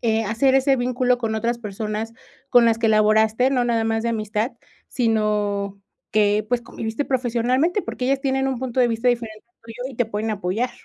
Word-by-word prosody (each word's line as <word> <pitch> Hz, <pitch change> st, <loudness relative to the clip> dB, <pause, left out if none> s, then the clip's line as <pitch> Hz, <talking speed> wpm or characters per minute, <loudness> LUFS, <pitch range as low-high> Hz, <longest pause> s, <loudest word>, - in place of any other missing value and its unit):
eh, 225 Hz, -1 st, +1 dB
hacer 230 Hz, +6 st, +2 dB
ese 270 Hz, 0 st, +3 dB
vínculo 250 Hz, 0 st, +1 dB
con 225 Hz, -2 st, -2 dB
otras 235 Hz, +2 st, -1 dB
personas 215 Hz, +1 st, -5 dB, 0.3 s
con 245 Hz, -1 st, +5 dB
las 225 Hz, -1 st, +3 dB
que 230 Hz, -1 st, +2 dB
laboraste, 220 Hz, +3 st, +3 dB
no 255 Hz, -3 st, +1 dB
nada 230 Hz, -2 st, +1 dB
más 225 Hz, 0 st, 0 dB
de 235 Hz, -, -1 dB
amistad, 215 Hz, +2 st, -2 dB, 0.4 s
sino 210 Hz, -4 st, 0 dB, 0.3 s
que, 210 Hz, 0 st, +2 dB
pues, 245 Hz, -1 st, 0 dB
conviviste 225 Hz, +3 st, -4 dB
profesionalmente, 255 Hz, -, 0 dB
porque 250 Hz, -, -4 dB
ellas 270 Hz, +1 st, +1 dB
tienen 270 Hz, 0 st, 0 dB
un 260 Hz, -, -2 dB
punto 255 Hz, 0 st, -2 dB
de 245 Hz, -, +4 dB
vista 230 Hz, +2 st, 0 dB
diferente 230 Hz, -3 st, -2 dB
al 235 Hz, -, -49 dB
tuyo 245 Hz, +4 st, -7 dB
y -, -, -11 dB
te 245 Hz, -, +1 dB
pueden 220 Hz, 0 st, -3 dB
apoyar. 210 Hz, +4 st, -2 dB
230 Hz, 195 wpm, -22 LUFS, 215-250 Hz, 0.4 s, con